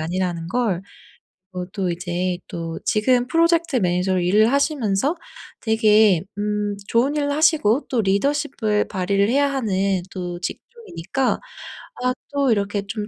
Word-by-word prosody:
아니라는 170 0 -2
걸. 200 -5 0 0.7
어 180 0 -4
또 190 -3 -1
이제 175 +1 -2
또 165 -1 -5
지금 245 +3 +2
프로젝트 335 0 +2
매니저로 180 -2 +1
일을 210 +5 +4
하시면서 280 - +1 0.4
되게 215 -5 +4 0.2
음 210 -1 -1
좋은 260 +6 +2
일을 285 -1 0
하시고 300 -5 +2
또 245 - +1
리더십을 215 +1 0
발휘를 195 +2 0
해야 280 +2 +2
하는 195 -7 0
또 175 -2 -5
직종이니까 270 - -3 0.6
아 255 0 +2 0.2
또 280 -3 +2
이렇게 205 -1 0
좀 210 0 -4
210 Hz, 275 characters per minute, -22 LUFS, 185-265 Hz, 0.7 s, 일을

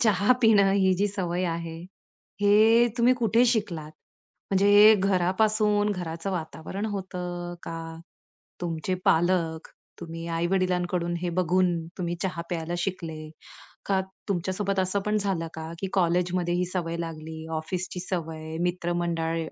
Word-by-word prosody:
चहा 210 +1 +4
पिणं 205 -3 +6
ही 190 -1 +3
जी 200 +3 +1
सवय 185 -3 -2
आहे, 165 -1 -5 0.6
हे 220 +4 +5
तुम्ही 245 +2 +5
कुठे 235 0 +3
शिकलात? 185 -10 -1 0.6
म्हणजे 195 +1 +3
हे 210 +2 +9
घरापासून 205 +2 +2
घराचं 175 0 -4
वातावरण 180 +4 -4
होतं? 180 -3 -5
का 165 - -6 0.9
तुमचे 170 +1 -2
पालक 165 -1 +2 0.3
तुम्ही 165 -1 -7
आई-वडिलांकडून 180 -1 0
हे 180 - -2
बघून 180 0 +2 0.2
तुम्ही 175 -1 -2
चहा 170 -3 -2
प्यायला 170 0 -3
शिकले? 160 -4 -4 0.6
का 195 -1 +2 0.3
तुमच्यासोबत 195 +2 -1
असं 185 +2 0
पण 210 0 +2
झालं 190 -5 -1
का, 160 0 -6
की 195 - -3
कॉलेजमध्ये 175 -1 +1
ही 180 +1 +1
सवय 170 -2 -2
लागली, 160 -1 -6
ऑफिसची 180 +3 -4
सवय, 160 -3 -4
मित्रमंडळ 175 -2 -1
180 Hz, 125 wpm, -26 LUFS, 170-195 Hz, 0.9 s, हे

